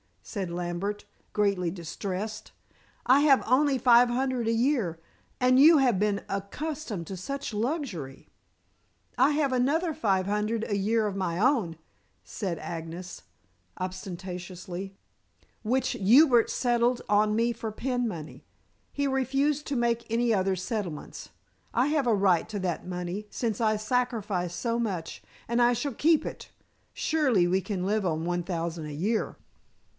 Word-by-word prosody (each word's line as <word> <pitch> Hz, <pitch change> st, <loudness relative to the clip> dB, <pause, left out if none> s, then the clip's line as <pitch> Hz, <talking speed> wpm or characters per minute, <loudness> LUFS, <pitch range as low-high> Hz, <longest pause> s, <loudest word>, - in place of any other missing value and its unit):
said 195 Hz, -5 st, -4 dB
Lambert, 175 Hz, +4 st, -3 dB, 0.3 s
greatly 200 Hz, -4 st, +1 dB
distressed. 195 Hz, +5 st, -5 dB, 0.5 s
"I 260 Hz, +3 st, +6 dB
have 280 Hz, -3 st, +5 dB
only 270 Hz, +3 st, +3 dB
five 245 Hz, -1 st, +6 dB
hundred 255 Hz, -1 st, -1 dB
a 230 Hz, -, +2 dB
year, 230 Hz, -, +1 dB, 0.4 s
and 255 Hz, +1 st, +4 dB
you 310 Hz, +2 st, +8 dB
have 245 Hz, -8 st, +3 dB
been 205 Hz, -1 st, 0 dB
accustomed 210 Hz, -, -4 dB
to 190 Hz, -, -6 dB
such 275 Hz, +7 st, -5 dB
luxury." 210 Hz, -, -3 dB, 0.9 s
"I 265 Hz, +4 st, +5 dB
have 290 Hz, -2 st, +1 dB
another 305 Hz, +7 st, +1 dB
five 195 Hz, -8 st, +1 dB
hundred 210 Hz, +2 st, -1 dB
a 205 Hz, -3 st, -1 dB
year 215 Hz, +3 st, +1 dB
of 205 Hz, -2 st, -2 dB
my 180 Hz, -3 st, -2 dB
own," 215 Hz, -, +2 dB, 0.5 s
said 185 Hz, -5 st, -4 dB
Agnes 165 Hz, +2 st, -7 dB, 0.5 s
obstinately, 185 Hz, 0 st, -6 dB, 0.7 s
"which 255 Hz, +3 st, +1 dB
Hubert 240 Hz, +4 st, +5 dB
settled 240 Hz, 0 st, +1 dB
on 210 Hz, +1 st, +3 dB
me 230 Hz, +2 st, +2 dB
for 230 Hz, -1 st, -5 dB
pin 245 Hz, +2 st, -1 dB
money. 160 Hz, -7 st, -7 dB, 0.5 s
He 285 Hz, 0 st, -1 dB
refused 275 Hz, +3 st, 0 dB
to 280 Hz, -, -2 dB
make 235 Hz, -1 st, 0 dB
any 235 Hz, 0 st, +2 dB
other 190 Hz, -1 st, +1 dB
settlements. 185 Hz, -5 st, -5 dB, 0.4 s
I 250 Hz, +3 st, +2 dB
have 295 Hz, -4 st, +1 dB
a 230 Hz, -, +4 dB
right 190 Hz, -4 st, +3 dB
to 210 Hz, -2 st, -4 dB
that 180 Hz, -2 st, -3 dB
money, 180 Hz, +3 st, -4 dB
since 225 Hz, -4 st, -2 dB
I 215 Hz, -2 st, +2 dB
sacrificed 215 Hz, -6 st, -1 dB
so 235 Hz, -1 st, -1 dB
much, 185 Hz, -8 st, -3 dB, 0.3 s
and 235 Hz, +1 st, +1 dB
I 240 Hz, 0 st, +5 dB
shall 275 Hz, +3 st, -2 dB
keep 315 Hz, +6 st, +3 dB
it. -, -, -7 dB, 0.4 s
Surely 260 Hz, -, +2 dB
we 185 Hz, +2 st, +2 dB
can 190 Hz, -3 st, -3 dB
live 210 Hz, 0 st, 0 dB
on 160 Hz, -2 st, -1 dB
one 175 Hz, 0 st, -1 dB
thousand 170 Hz, -2 st, -3 dB
a 150 Hz, -, -6 dB
year." 210 Hz, +9 st, -1 dB
215 Hz, 145 wpm, -28 LUFS, 185-250 Hz, 0.9 s, you